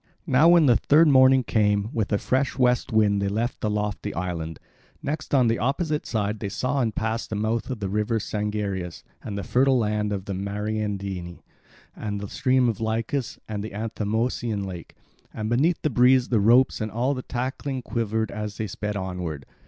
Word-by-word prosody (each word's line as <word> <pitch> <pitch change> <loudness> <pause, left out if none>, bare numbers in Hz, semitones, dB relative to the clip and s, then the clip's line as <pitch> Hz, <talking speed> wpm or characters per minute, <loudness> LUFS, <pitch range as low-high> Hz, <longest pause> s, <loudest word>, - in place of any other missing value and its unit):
Now 145 +6 +5
when 170 -2 +6
the 120 -4 +5
third 155 +2 +5
morning 130 -1 +6
came, 105 -1 +1
with 110 -2 -1
a 105 - +3
fresh 130 +6 0
west 125 -2 +2
wind 105 -2 +3
they 100 - 0
left 115 +5 -2
the 105 - 0
lofty 105 0 -2
island. 85 -2 -4 0.5
Next, 155 +2 -4
on 130 -4 +4
the 115 0 +1
opposite 150 +5 -1
side 105 -1 -1
they 100 - -3
saw 130 +7 -1
and 110 -4 -1
passed 110 +1 -2
the 110 - -3
mouth 110 +4 -1
of 125 -5 -4
the 100 - -1
river 105 +3 0
Sangarius 105 -4 -3 0.2
and 100 -2 -5
the 100 - -3
fertile 130 +1 +3
land 105 -2 0
of 100 -2 -3
the 100 - -4
Mariandyni, 100 -2 -4 0.5
and 105 -1 -4
the 100 - -5
stream 130 -1 +2
of 115 -2 -2
Lycus 115 +4 -2
and 105 -2 -4
the 110 -2 -7
Anthemoeisian 110 0 -2
lake; 90 -3 -8 0.4
and 110 +1 -3
beneath 155 +8 +2
the 155 - +1
breeze 125 +1 +4
the 115 - +3
ropes 120 +5 +4
and 110 - -2
all 125 +5 0
the 130 - -4
tackling 130 +1 -4
quivered 110 -2 -1
as 105 -2 -5
they 110 - -2
sped 105 +1 -4
onward. 90 -7 -4
110 Hz, 190 wpm, -25 LUFS, 100-125 Hz, 0.5 s, when